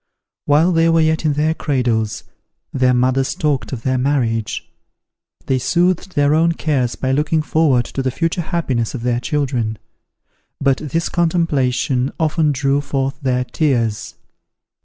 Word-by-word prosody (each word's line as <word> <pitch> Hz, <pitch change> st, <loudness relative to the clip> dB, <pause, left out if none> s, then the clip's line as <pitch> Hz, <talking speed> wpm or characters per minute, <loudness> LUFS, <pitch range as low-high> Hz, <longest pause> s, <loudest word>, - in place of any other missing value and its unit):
While 155 Hz, +5 st, +4 dB
they 165 Hz, -1 st, +3 dB
were 165 Hz, 0 st, +3 dB
yet 160 Hz, 0 st, +1 dB
in 150 Hz, -, +2 dB
their 155 Hz, +2 st, +1 dB
cradles, 120 Hz, -8 st, -1 dB, 0.5 s
their 130 Hz, -1 st, +3 dB
mothers 130 Hz, +2 st, +1 dB
talked 140 Hz, -7 st, -1 dB
of 115 Hz, -3 st, -5 dB
their 130 Hz, -1 st, 0 dB
marriage. 120 Hz, -5 st, -1 dB, 0.8 s
They 130 Hz, -1 st, +1 dB
soothed 175 Hz, +6 st, 0 dB
their 145 Hz, 0 st, +3 dB
own 165 Hz, +2 st, +3 dB
cares 135 Hz, -7 st, -1 dB
by 130 Hz, -, -2 dB
looking 150 Hz, +3 st, +1 dB
forward 150 Hz, -7 st, +2 dB
to 135 Hz, -, -4 dB
the 130 Hz, -, 0 dB
future 165 Hz, +6 st, -1 dB
happiness 140 Hz, -, -2 dB
of 120 Hz, -, -6 dB
their 120 Hz, -1 st, 0 dB
children; 125 Hz, -5 st, -2 dB, 0.8 s
but 135 Hz, -1 st, +2 dB
this 160 Hz, +3 st, -2 dB
contemplation 140 Hz, -7 st, 0 dB
often 155 Hz, -1 st, +1 dB
drew 140 Hz, +1 st, +1 dB
forth 135 Hz, -1 st, -2 dB
their 125 Hz, -2 st, 0 dB
tears. 120 Hz, -5 st, -1 dB
140 Hz, 145 wpm, -18 LUFS, 125-160 Hz, 0.8 s, While